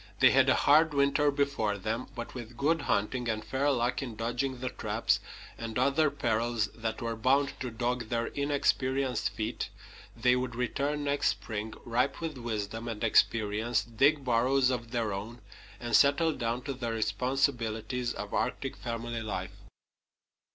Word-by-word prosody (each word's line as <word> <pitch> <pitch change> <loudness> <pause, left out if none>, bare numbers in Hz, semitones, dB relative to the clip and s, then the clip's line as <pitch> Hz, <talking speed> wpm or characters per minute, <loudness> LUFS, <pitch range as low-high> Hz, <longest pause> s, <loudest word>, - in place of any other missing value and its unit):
They - - +7
had - - +5
a - - +5
hard 155 +1 +4
winter 140 +1 +3
before 140 -8 0
them, 110 +5 -3
but 120 -1 -6
with 120 -2 -8
good 160 +4 +2
hunting, 120 0 0
and 110 -1 -2
fair 135 +2 0
luck 125 -1 +1
in 120 -5 -5
dodging 120 +4 -2
the 130 0 -2
traps - - 0 0.4
and 115 0 -4
other 140 +4 +3
perils 115 -5 0
that 115 0 -4
were 115 0 -2
bound 135 +5 +2
to 125 - -3
dog 120 +1 -2
their 115 -1 0
inexperienced 135 -3 0
feet, 110 +1 -3 0.5
they 125 +2 +4
would 125 -1 -2
return 140 +4 -1
next 145 0 +1
spring, 110 0 -3
ripe 125 +4 0
with 160 -5 -4
wisdom 115 -1 -4
and 115 -2 -4
experience, 110 0 +2
dig 135 +6 +2
burrows 125 +2 +3
of 120 -2 -3
their 115 -4 -1
own, 110 +5 -6 0.4
and 120 -1 0
settle 145 +3 +4
down 120 -1 -2
to 140 - -3
the 120 -3 -3
responsibilities 115 +1 0
of - - -6
Arctic - - -1
family 115 0 -4
life. 95 -4 -4
120 Hz, 160 wpm, -30 LUFS, 115-135 Hz, 0.5 s, They